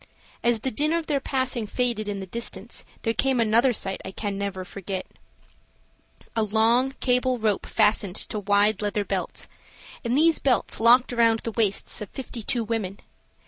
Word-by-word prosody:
As 235 -2 +2
the 265 - -1
din 300 +8 +1
of 335 -1 0
their 290 -3 0
passing 260 -5 -1
faded 235 -3 -1
in 200 -1 -3
the 190 - -5
distance 220 +1 -4 0.2
there 225 - +1
came 260 +2 +1
another 230 +3 +4
sight 195 -4 -1
I - - -6
can 200 +1 -4
never 195 -2 -4
forget: 190 -1 -5 1.3
A 225 - +2
long 225 +5 +2
cable 250 0 +2
rope 215 -3 0
fastened 210 -3 +2
to 215 - 0
wide 205 +2 +2
leather 205 0 -1
belts, - - -3 0.6
and 240 +2 0
these 325 +1 +4
belts 255 -4 +1
locked 245 +2 +5
around 230 -1 +3
the 230 - -4
waists 215 -3 -1
of 210 - -6
fifty 255 -3 -7
two 235 +2 -1
women. 210 -4 -3
225 Hz, 170 wpm, -25 LUFS, 205-250 Hz, 1.3 s, locked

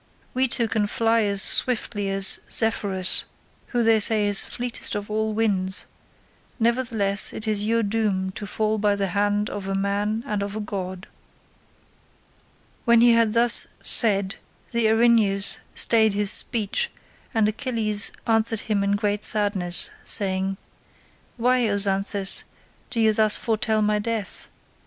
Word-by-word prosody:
We 260 +1 0
two 235 -1 0
can 215 -2 -2
fly 225 +2 0
as 200 -1 0
swiftly 215 -5 +1
as 195 0 +3
Zephyrus 200 -4 +1 0.4
who 240 -2 -2
they 225 -1 +3
say 215 0 +2
is 205 -1 +3
fleetest 245 -3 -4
of 205 0 -6
all 220 0 -2
winds; 195 -4 +1 0.7
nevertheless 225 -4 +1
it 220 - -8
is 210 -1 0
your 230 +1 0
doom 200 -3 -2
to 205 +2 -9
fall 215 +1 -2
by 205 -1 0
the 200 -1 -3
hand 205 +2 -1
of 195 -1 -7
a 195 - -3
man 205 +3 -3
and 210 -1 -4
of 200 +1 -6
a - - -4
god." 190 -2 -7 1.8
When 235 -1 +3
he 240 0 +5
had 230 -2 +1
thus 235 0 +7 0.2
said 200 -4 +2 0.3
the 235 -1 0
Erinyes 220 -3 +1 0.2
stayed 220 -3 +2
his 205 -1 +1
speech, 235 - 0 0.4
and 220 -4 0
Achilles 215 -3 -1
answered 225 -1 0
him 205 -2 -2
in 200 0 -1
great 205 0 -3
sadness, 200 -4 +1
saying, 190 -1 +2 0.8
"Why, 245 -1 +1
O 200 - -1
Xanthus, 195 0 +2 0.4
do 235 - -4
you 220 -1 +2
thus 215 -1 +2
foretell 220 -1 -1
my 210 0 0
death? 220 -1 -4
210 Hz, 145 wpm, -22 LUFS, 200-225 Hz, 1.8 s, thus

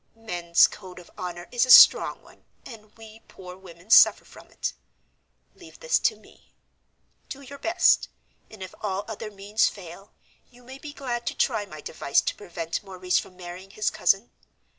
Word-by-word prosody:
"Men's 175 -6 +2
code 185 -3 -9
of 180 - -14
honor 175 -1 -7
is 245 -1 +1
a 255 - -2
strong 485 - +7
one, - - -21 0.2
and 215 -3 -14
we 220 0 -14
poor 180 -1 -12
women 185 +1 -15
suffer - - +6
from - - -16
it. - - -5 0.8
Leave - - -16
this - - +1
to - - +1
me; - - -23 0.7
do 280 - -8
your 280 +1 -12
best, 335 +5 +2 0.4
and 215 -3 -11
if 185 - -10
all 200 -1 -3
other 220 -1 -7
means 205 +2 0
fail, 195 +1 -13 0.4
you 245 0 -21
may 260 +2 -12
be 295 +1 -9
glad 245 -5 -5
to - - -3
try 205 -1 -1
my 155 -4 -11
device 140 -3 -1
to - - -3
prevent 170 -4 -6
Maurice 185 -2 -2
from 185 - -11
marrying 180 +1 -10
his 215 +2 -2
cousin. 195 +4 0
200 Hz, 175 wpm, -25 LUFS, 180-235 Hz, 0.8 s, strong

